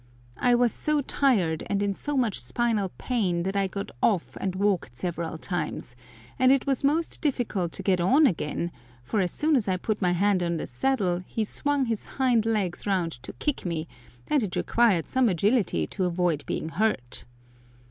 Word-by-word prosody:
I 245 -1 +4
was 240 -2 +3
so 305 -1 0
tired 205 - +1
and 200 0 +1
in 200 -1 0
so 290 +8 -3
much 235 -6 +1
spinal 205 - 0
pain 190 -9 0
that 195 +2 -2
I 195 -1 +2
got 200 +1 -5
off 195 -7 +1
and 185 -1 -2
walked 190 - 0
several 170 -2 -3
times, 160 -7 -4 0.4
and 255 0 +6
it 270 -1 +3
was 275 -2 +1
most 315 +4 +1
difficult 220 - -1
to - - -4
get 185 -3 +2
on 270 - +5
again, 170 - -1 0.3
for 205 - -1
as 185 -2 +1
soon 305 - +1
as 235 -7 +1
I 185 -1 +1
put 215 +3 -2
my 180 -2 +2
hand 195 +1 +2
on 170 -1 0
the - - -3
saddle 180 - 0
he 225 - -1
swung 285 +5 0
his 225 -3 -3
hind 245 -4 +3
legs 205 -5 -1
round 185 -4 +1
to 130 - -8
kick 295 -2 -2
me, 165 -2 -3 0.4
and 295 - +2
it 205 -5 -3
required 225 -8 +2
some 260 -3 +2
agility 195 - +1
to 185 - -2
avoid 175 -4 0
being 160 - -2
hurt. 160 - -1
200 Hz, 190 wpm, -26 LUFS, 175-245 Hz, 0.4 s, and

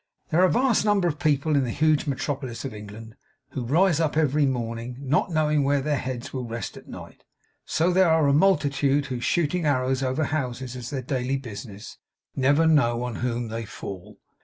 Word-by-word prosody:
As - - -41
there 165 - +3
are - - +7
a - - +2
vast 250 -3 +2
number 205 -4 +2
of 150 -3 -2
people 150 0 +1
in 140 - +3
the 125 - -2
huge 155 +4 +2
metropolis 135 -2 -3
of 135 - -5
England 105 +2 -10 0.3
who 130 - -4
rise 165 +6 +3
up 155 -2 0
every 150 -2 +3
morning 120 -1 -3
not 140 +6 0
knowing 150 -2 +2
where 140 +1 +2
their 145 0 -1
heads 125 -2 -5
will 130 -2 -3
rest 115 +1 -5
at - - -13
night, - - -11 0.4
so 170 +3 +1
there 185 -1 +4
are 160 -2 +4
a 140 - +3
multitude 145 -4 +2
who 125 -2 -4
shooting 170 +6 0
arrows 130 -1 +1
over 130 +4 0
houses 130 -4 -3
as 125 -1 -6
their 135 -3 -4
daily 130 +1 -1
business, 110 -4 -9 0.4
never 140 +4 +3
know 125 -7 +3
on 125 -2 -4
whom 120 -1 -2
they 115 +1 -4
fall. 100 -1 -9
135 Hz, 200 wpm, -25 LUFS, 120-155 Hz, 0.4 s, are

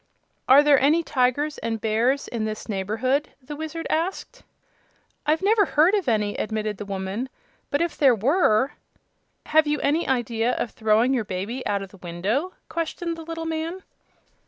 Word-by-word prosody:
"Are 275 +3 +8
there 290 -2 +5
any 310 +5 +3
tigers 285 +3 0
and 225 -1 -3
bears 230 +6 +1
in 230 -2 -3
this 215 0 -5
neighborhood?" 225 +8 -1
the 280 +3 -8
Wizard 315 +2 -5
asked. 335 +5 -2 0.9
"I've 315 +4 +2
never 420 +1 +4
heard 325 +4 +3
of 390 -10 +1
any," 210 -2 0
admitted 215 -1 -2
the 205 - -6
woman, 195 +5 -4 0.4
"but 285 +3 +1
if 340 - -3
there 270 -4 +5
were 260 - +2 0.4
" - - -47
"Have 315 -1 +5
you 295 0 0
any 310 +4 +1
idea 240 -2 0
of 235 - -2
throwing 220 +4 +2
your 245 -4 +1
baby 200 +8 -4
out 200 -1 -1
of 195 - -9
the 195 - -16
window?" 195 - -2
questioned 335 +1 -3
the 330 - -9
little 330 0 -5
man. 325 +3 -3
260 Hz, 170 wpm, -24 LUFS, 215-315 Hz, 0.9 s, Are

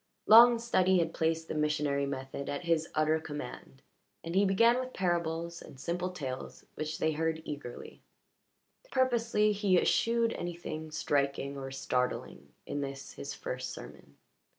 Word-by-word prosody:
Long 235 +2 +9
study 190 -5 +3
had 165 -1 +1
placed 160 0 0
the - - -4
missionary 150 -2 0
method 135 0 -5
at 145 +5 -3
his 165 -2 +1
utter 155 +1 +3
command, 145 -3 -8 0.4
and 165 - -5
he 195 +2 +4
began 230 +5 +4
with 255 0 -5
parables 170 -2 -1
and 130 - -12
simple 175 +5 -2
tales 135 -8 -6
which 155 0 -4
they 160 - +1
heard 160 +1 -1
eagerly. 145 -5 -8 0.9
Purposely, 235 - +2
he 200 -3 +2
eschewed 230 0 +2
anything 170 -2 -5
striking 140 -2 -1
or 135 -1 -5
startling 125 - -2
in 145 - -3
this 135 -1 -6
his 140 - -6
first 125 0 -5
sermon. - - -12
160 Hz, 145 wpm, -31 LUFS, 140-185 Hz, 0.9 s, Long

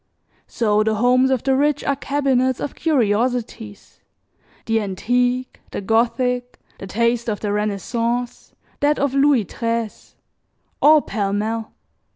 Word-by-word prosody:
So 215 -3 +1
the 220 0 +1
homes 250 +4 +3
of 260 -3 0
the 270 -1 +2
rich 290 +1 +1
are 280 - 0
cabinets 265 -2 0
of 290 - -4
curiosities: 230 -5 -1 0.7
the 225 0 +1
antique, 245 +6 -1
the - - -5
Gothic, 245 +4 0 0.2
the 195 - -7
taste 235 +3 0
of 210 - -3
the 205 - -2
Renaissance, 230 +4 -2 0.2
that 295 +1 +2
of 280 -1 0
Louis 275 -5 +3
XIII, 230 -2 -2 0.9
all 305 0 +6
pell 200 -3 -2
mell. 220 +2 -3
240 Hz, 130 wpm, -21 LUFS, 215-260 Hz, 0.9 s, all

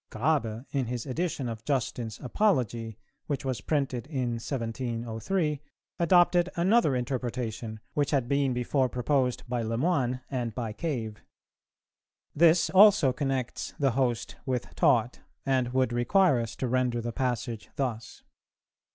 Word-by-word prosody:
Grabe, 120 -2 -1
in 135 -4 -1
his 120 -1 -4
edition 145 -1 -2
of 115 -1 -6
'Justin's 120 -4 -2
Apology,' 120 - 0 0.3
which 140 -2 -3
was 130 -4 -2
printed 135 -5 -1
in 125 -6 -2
1703, 120 - -2 0.4
adopted 175 +1 +4
another 180 - +3
interpretation, 120 -3 -3
which 145 -1 +1
had 135 -5 +1
been 140 0 +1
before 125 +2 +1
proposed 125 0 0
by 120 -1 -1
Le 115 0 -2
Moyne 130 -4 +1
and 120 -5 -2
by 115 -3 -3
Cave. 115 -7 -4 1.1
This 165 +2 +4
also 190 -8 +6
connects 135 -2 -3
'the 135 -2 +2
host' 120 -2 -1
with 125 -2 -3
'taught,' 125 -7 +2 0.3
and 130 -2 +1
would 130 -2 +1
require 125 +5 +3
us 115 -1 -4
to 130 - -2
render 125 -1 +1
the 120 0 -4
passage 120 -3 -2
thus 120 -5 -4
125 Hz, 135 wpm, -28 LUFS, 120-145 Hz, 1.1 s, also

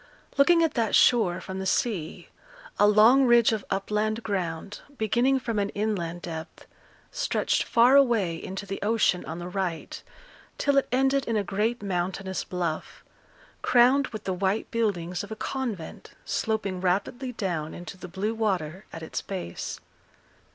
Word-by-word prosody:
Looking 335 +4 +5
at 320 - +1
that 230 -4 +1
shore 215 -8 +4
from 190 0 -6
the 190 - -3
sea, 185 -6 -1 0.5
a 205 - +6
long 225 +6 +6
ridge 240 -2 +5
of 215 -3 -2
upland 210 +3 -1
ground, 190 -1 -3 0.2
beginning 245 +5 +2
from 230 -4 -2
an 200 0 0
inland 180 -5 -2
depth, 160 -1 -7 0.5
stretched - - 0
far 240 +3 +4
away 230 -11 +4
into 190 +2 -5
the 195 0 -5
ocean 210 -3 +2
on 160 - -6
the 175 0 -6
right, 180 -3 -4 0.6
till 285 -1 +2
it - - -5
ended 270 +2 +2
in 230 -2 +1
a 205 - +1
great 210 +5 -1
mountainous 190 0 -2
bluff, 170 -3 -4 0.6
crowned 255 +3 +4
with 215 -2 -8
the 190 - -2
white 190 +3 -1
buildings 180 -6 -1
of 205 - -10
a - - -3
convent 225 -9 -5
sloping 200 -2 -2
rapidly 225 +8 -1
down 170 -8 -3
into 175 +2 -8
the 185 -1 -9
blue 195 +5 -2
water 190 -5 -2
at 165 - -8
its 160 - -4
base. 185 - -5
205 Hz, 155 wpm, -26 LUFS, 180-235 Hz, 0.6 s, a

